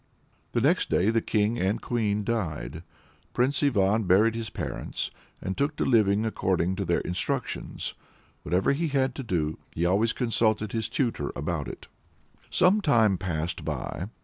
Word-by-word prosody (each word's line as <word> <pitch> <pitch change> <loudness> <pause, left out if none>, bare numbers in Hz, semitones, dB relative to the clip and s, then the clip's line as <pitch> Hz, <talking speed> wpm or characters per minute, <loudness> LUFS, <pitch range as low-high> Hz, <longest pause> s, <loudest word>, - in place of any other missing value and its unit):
The - - +2
next - - +2
day 100 +5 +3
the 115 0 +2
king 110 +2 +1
and 95 +3 +1
queen 105 -3 0
died. 80 - -3 0.5
Prince 135 +3 +2
Ivan 110 -6 +2
buried 105 +5 +4
his 115 -1 -4
parents, - - -4 0.3
and 95 - -2
took 140 +2 0
to - - -1
living 110 -3 +3
according 95 -4 0
to 100 - -1
their 85 - +1
instructions. 90 0 -3 0.5
Whatever 90 - +1
he 160 +4 0
had 135 -3 +1
to 135 - -5
do, 80 -8 -1
he 85 - 0
always 100 +6 +3
consulted 110 -4 +1
his 110 -2 -2
tutor 125 -4 -1
about - - -2
it. - - -9 0.6
Some 190 +4 +4
time 110 - +3
passed 85 -1 -3
by. 90 - -4
110 Hz, 155 wpm, -27 LUFS, 95-120 Hz, 0.6 s, buried